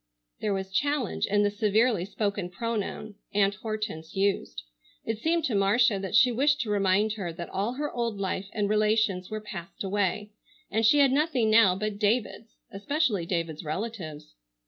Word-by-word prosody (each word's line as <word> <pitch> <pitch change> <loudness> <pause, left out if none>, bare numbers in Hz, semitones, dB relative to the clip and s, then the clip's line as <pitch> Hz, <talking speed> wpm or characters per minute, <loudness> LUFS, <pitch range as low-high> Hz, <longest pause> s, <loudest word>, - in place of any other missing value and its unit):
There 205 -2 -1
was 190 0 -5
challenge 280 +3 0
in 205 +1 +2
the 205 - +2
severely 210 -1 +2
spoken 200 -2 -2
pronoun 215 +1 -4 0.2
Aunt 200 -1 +3
Hortense 215 -8 -5
used. 195 - -1 0.4
It 225 -1 -2
seemed 325 +4 +1
to 255 - -1
Marcia 205 +2 +3
that 190 +1 -3
she 245 +3 +6
wished 290 +5 +2
to 220 -5 -3
remind 205 +1 +2
her 195 -6 -4
that 170 +1 -8
all 205 +5 -1
her 295 +3 -3
old 235 -3 -2
life 190 0 -3
and 205 -2 -1
relations 210 -3 +1
were 215 - -4
passed 195 -3 -8
away, 205 +1 -1 0.4
and 225 - +1
she 230 +7 +5
had 280 -2 +5
nothing 270 -6 +2
now 210 -5 +6
but 210 +1 -3
David's, 220 +1 -1 0.2
especially 205 - -1
David's 165 -3 -2
relatives. 160 - -5
210 Hz, 170 wpm, -27 LUFS, 195-230 Hz, 0.4 s, she